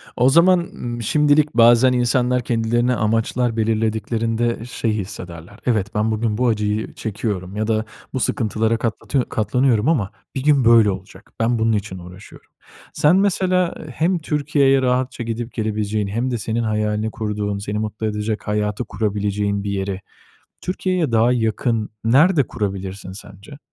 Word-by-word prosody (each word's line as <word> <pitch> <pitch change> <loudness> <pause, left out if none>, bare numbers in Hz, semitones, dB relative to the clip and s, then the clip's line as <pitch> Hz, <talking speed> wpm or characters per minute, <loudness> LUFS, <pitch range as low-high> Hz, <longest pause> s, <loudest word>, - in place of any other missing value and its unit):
O 125 +2 +4
zaman, 175 +5 +5
ımm, 120 -8 -6
şimdilik 150 +5 +3
bazen 120 +2 +6
insanlar 125 0 +1
kendilerine 120 +2 +1
amaçlar 115 +2 0
belirlediklerinde 115 +1 -1
şey 115 -2 -2
hissederler; 95 -2 -7
"Evet, 110 -3 0
ben 105 +1 +1
bugün 110 -1 -1
bu 125 +1 +2
acıyı 105 -1 -1
çekiyorum 100 -3 -4
ya 110 +1 -1
da 110 -1 0 0.3
bu 130 - -1
sıkıntılara 110 -1 0
katlatı 120 +3 -2
katlanıyorum 115 +1 +1
ama 115 - +1 0.2
bir 135 - -3
gün 145 -4 +3
böyle 115 -3 +6
olacak, 95 +1 -10
ben 115 +1 +1
bunun 115 0 +2
için 100 -3 -3
uğraşıyorum." 90 +3 -13 0.4
Sen 150 +4 +4
mesela, 185 -2 +2
ııı, - - -9
hem 170 +7 0
Türkiye'ye 145 -3 +2
rahatça 125 -1 0
gidip 115 +1 -4
gelebileceğin 110 -2 -1
hem 115 +6 -2
de 120 - -1
senin 115 +2 -2
hayalini 105 0 -1
kurduğun, 105 -2 -3
seni 105 +1 -3
mutlu 110 0 -4
edecek 105 +1 -3
hayatı 105 +2 -1
kurabileceğin 105 -1 -1
bir 100 - -3
yeri 95 -1 -3 0.6
Türkiye'ye 180 -6 -1
daha 115 +2 +4
yakın 115 -1 0
nerede 140 +5 +4
kurabilirsin 95 -2 -5
sence? 100 +7 -12
115 Hz, 145 wpm, -20 LUFS, 105-125 Hz, 0.6 s, bazen